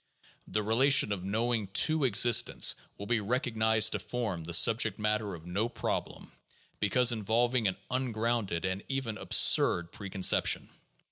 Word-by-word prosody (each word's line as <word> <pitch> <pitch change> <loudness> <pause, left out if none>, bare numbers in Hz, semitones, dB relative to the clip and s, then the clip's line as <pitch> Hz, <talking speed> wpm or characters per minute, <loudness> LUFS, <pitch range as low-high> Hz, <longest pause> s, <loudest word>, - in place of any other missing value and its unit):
The 105 - -3
relation 130 +3 +3
of 95 -3 -4
knowing 110 +2 -2 0.2
to 155 -3 -1
existence 120 0 +3 0.2
will 100 - -8
be 120 +1 -1
recognized 110 -1 +1
to - - -3
form 110 -9 -5
the 85 - -5
subject 115 +6 +3
matter 105 -2 -2
of 80 0 -14
no 100 +7 -3
problem, - - -6 0.5
because 120 +5 +2
in 110 -3 -5
volving 120 +2 0
an 95 - -7
ungrounded 115 -7 -3
and 95 +1 -3
even 135 -5 -4
absurd 85 0 +3
preconception. 100 -2 0
110 Hz, 140 wpm, -29 LUFS, 100-120 Hz, 0.5 s, relation